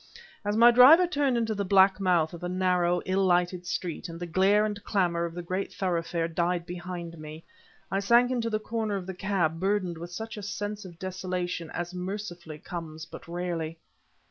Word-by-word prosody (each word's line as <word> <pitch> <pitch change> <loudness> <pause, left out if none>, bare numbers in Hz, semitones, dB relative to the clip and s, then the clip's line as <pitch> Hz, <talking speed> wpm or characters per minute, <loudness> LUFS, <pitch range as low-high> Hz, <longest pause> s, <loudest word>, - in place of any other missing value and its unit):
As 205 +1 -1
my 235 +1 +8
driver 270 +9 +8
turned 285 -7 +1
into 225 -1 0
the 205 -1 -2
black 195 0 +5
mouth 175 -4 +2
of 170 - -9
a 180 - -2
narrow, 180 -1 +1
ill 190 +1 +1
lighted 180 0 +1
street, 175 -2 -4
and 165 0 -8
the 175 - -4
glare 195 +5 +3
and 205 -1 -4
clamor 175 -4 +1
of 170 0 -6
the 175 - -5
greater 185 +3 -3
thoroughfare 170 -2 -1
died 170 +1 -1
behind 175 -1 -7
me, 155 +1 -9 0.5
I 195 - +1
sank 235 +5 +4
into 235 -2 0
the 215 - 0
corner 220 -1 -2
of 190 -2 -4
the 190 - -5
cab 180 -4 -1
burdened 190 -3 0
with 170 +1 -7
such 220 +4 -6
a - - -5
sense 205 0 -5
of 175 -3 -11
desolation 180 -2 -4
as 175 +1 -5
mercifully 180 -4 -6
comes 160 -1 -7
but - - -11
rarely. 170 -2 -3
180 Hz, 195 wpm, -28 LUFS, 170-205 Hz, 0.5 s, my